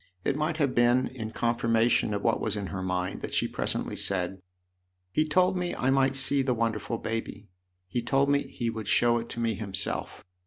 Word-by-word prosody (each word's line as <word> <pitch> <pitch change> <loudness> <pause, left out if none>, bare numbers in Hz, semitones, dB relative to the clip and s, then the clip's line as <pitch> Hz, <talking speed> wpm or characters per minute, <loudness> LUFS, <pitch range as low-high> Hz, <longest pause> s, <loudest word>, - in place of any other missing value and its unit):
It 140 - 0
might 155 +2 -1
have 140 -5 +1
been 120 +2 +3
in 115 -4 -6
confirmation 115 -1 +1
of 100 - -4
what 115 - +1
was 110 -1 -1
in 100 -2 -3
her 95 - -3
mind 90 0 -2
that - - -4
she - - +2
presently - - -2
said: 95 -1 0 0.3
" - - -49 0.3
He 155 +7 +1
told 185 +4 +3
me 180 -1 -2
I 130 - +1
might 135 0 +2
see 135 +1 +4
the 130 -2 0
wonderful 115 0 -1
baby. 110 -2 -5 0.4
He 120 +6 -2
told 135 +4 +2
me 140 0 +3
he 115 -1 -3
would 110 -2 -6
show 120 0 +3
it 115 - -7
to 120 - -6
me 115 -1 +1
himself." 95 -2 -3
115 Hz, 205 wpm, -28 LUFS, 105-135 Hz, 0.4 s, see